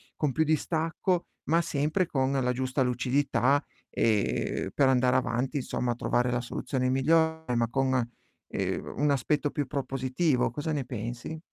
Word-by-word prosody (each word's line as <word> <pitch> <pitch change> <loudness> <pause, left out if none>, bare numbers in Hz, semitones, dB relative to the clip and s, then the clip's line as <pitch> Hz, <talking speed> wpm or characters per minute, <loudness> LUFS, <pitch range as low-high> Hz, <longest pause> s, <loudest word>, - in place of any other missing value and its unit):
con 150 -3 0
più 160 +4 +2
distacco, 160 +3 0 0.2
ma 165 +3 +3
sempre 155 +4 0
con 135 -4 0
la 125 -2 +1
giusta 130 +1 0
lucidità, 130 +2 +1 0.3
ehm, 105 -3 0
per 140 -2 +4
andare 125 0 +3
avanti 130 +3 0
insomma, 125 -2 -1
trovare 125 +1 +1
la 120 - 0
soluzione 130 +1 -2
migliore, 160 +1 +2
ma 115 -1 +2
con, 130 -1 +1 0.4
ehm, - - -3
un 145 +1 +2
aspetto 145 +2 +1
più 145 -3 -2
propositivo, 135 0 0
cosa 150 +6 -3
ne 145 -4 -1
pensi? 120 +6 -5
135 Hz, 145 wpm, -28 LUFS, 125-150 Hz, 0.4 s, per